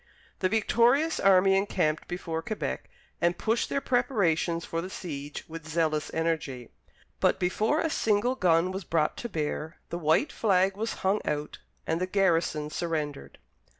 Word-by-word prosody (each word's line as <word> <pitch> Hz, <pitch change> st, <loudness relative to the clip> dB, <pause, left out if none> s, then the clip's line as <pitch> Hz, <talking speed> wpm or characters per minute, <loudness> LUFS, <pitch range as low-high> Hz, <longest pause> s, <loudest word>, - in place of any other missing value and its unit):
The 185 Hz, -, +1 dB
victorious 240 Hz, -, +3 dB
army 195 Hz, 0 st, +5 dB
encamped 180 Hz, -6 st, 0 dB
before 170 Hz, -2 st, -3 dB
Quebec 215 Hz, +5 st, -4 dB, 0.3 s
and 170 Hz, 0 st, +2 dB
pushed 225 Hz, +2 st, 0 dB
their 280 Hz, -, 0 dB
preparations 185 Hz, -11 st, +1 dB
for 165 Hz, -, -3 dB
the 185 Hz, -, -6 dB
siege 145 Hz, -6 st, -6 dB
with 160 Hz, -1 st, -9 dB
zealous 155 Hz, -1 st, 0 dB
energy, 160 Hz, -7 st, -2 dB, 0.5 s
but, -, -, +2 dB
before 215 Hz, -, +1 dB
a 325 Hz, -, 0 dB
single 220 Hz, +2 st, +2 dB
gun 180 Hz, -5 st, +2 dB
was 190 Hz, +1 st, -5 dB
brought 160 Hz, -2 st, 0 dB
to 240 Hz, -, -5 dB
bear, 155 Hz, -2 st, -3 dB
the 170 Hz, -, -3 dB
white 160 Hz, -, +2 dB
flag 190 Hz, -2 st, +2 dB
was 225 Hz, +3 st, -2 dB
hung 195 Hz, +3 st, +2 dB
out, 150 Hz, 0 st, -3 dB, 0.3 s
and 165 Hz, +2 st, -1 dB
the 185 Hz, -, 0 dB
garrison 165 Hz, -6 st, +1 dB
surrendered. 150 Hz, -, -3 dB
175 Hz, 150 wpm, -28 LUFS, 160-205 Hz, 0.5 s, army